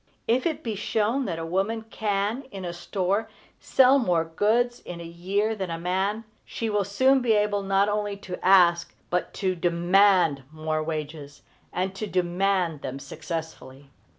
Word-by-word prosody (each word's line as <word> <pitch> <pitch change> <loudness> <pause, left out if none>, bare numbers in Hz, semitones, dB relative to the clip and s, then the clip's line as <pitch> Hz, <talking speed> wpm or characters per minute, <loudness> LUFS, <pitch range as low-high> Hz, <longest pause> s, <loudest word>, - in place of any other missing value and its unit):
If 250 +6 +2
it 315 -2 -3
be 225 - -2
shown 220 +5 0
that 170 -6 -3
a 165 - -4
woman 195 +6 -1
can, 215 +3 -2
in 195 -4 -7
a 175 - -4
store, 195 +4 -1 0.3
sell 265 +1 +5
more 175 -9 +1
goods 225 +8 +1
in 175 -1 -8
a - - -7
year 190 +6 -1
than 190 -4 -4
a 165 - -3
man, 190 +5 -1 0.2
she 225 -1 -4
will 205 -1 +1
soon 260 +7 +3
be 235 -2 +3
able 210 -1 +1
not 195 +1 +2
only 205 -1 -1
to 185 -2 -8
ask 175 -2 +4 0.2
but 180 0 -1
to 190 -2 0
demand 175 -2 +3
more 155 0 -2
wages, 150 -2 -6 0.3
and 185 +1 -2
to 210 +2 -5
demand 180 -3 0
them 135 0 -5
successfully. 140 -2 -7
195 Hz, 165 wpm, -26 LUFS, 170-210 Hz, 0.3 s, sell